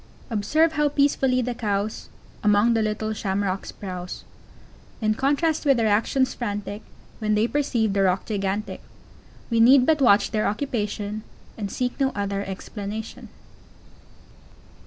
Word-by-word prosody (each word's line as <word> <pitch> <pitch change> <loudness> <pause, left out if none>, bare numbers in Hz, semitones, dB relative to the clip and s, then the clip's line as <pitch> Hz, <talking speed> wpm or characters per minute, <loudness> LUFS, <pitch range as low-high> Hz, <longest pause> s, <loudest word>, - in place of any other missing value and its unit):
] - - -26
Observe 290 +10 +2
how 300 -2 +1
peacefully 270 -3 +2
the 245 +1 -2
Cows 210 -2 -2 0.3
Among 210 +2 +4
the 225 - +2
little 215 0 -1
Shamrocks 195 -2 -2
browse, 180 -2 -7 0.8
In 215 -1 +1
contrast 290 +6 +1
with 275 -4 +4
their 230 - +1
actions 230 +5 +2
frantic 205 -2 -4 0.4
When 215 -1 +1
they 210 +2 +3
perceive 240 -7 0
the 200 - +1
Roc 185 0 +1
gigantic; 205 0 -3 0.7
We 230 - +2
need 250 +3 +7
but 310 -1 +2
watch 200 -5 +4
thei_r 215 -1 0
oc_upation, 210 -4 -3 0.3
And 200 -3 -5
seek 250 +1 -2
no 270 -1 +2
other 200 -1 -2
explanation. 205 +3 -6
215 Hz, 135 wpm, -24 LUFS, 205-255 Hz, 0.8 s, need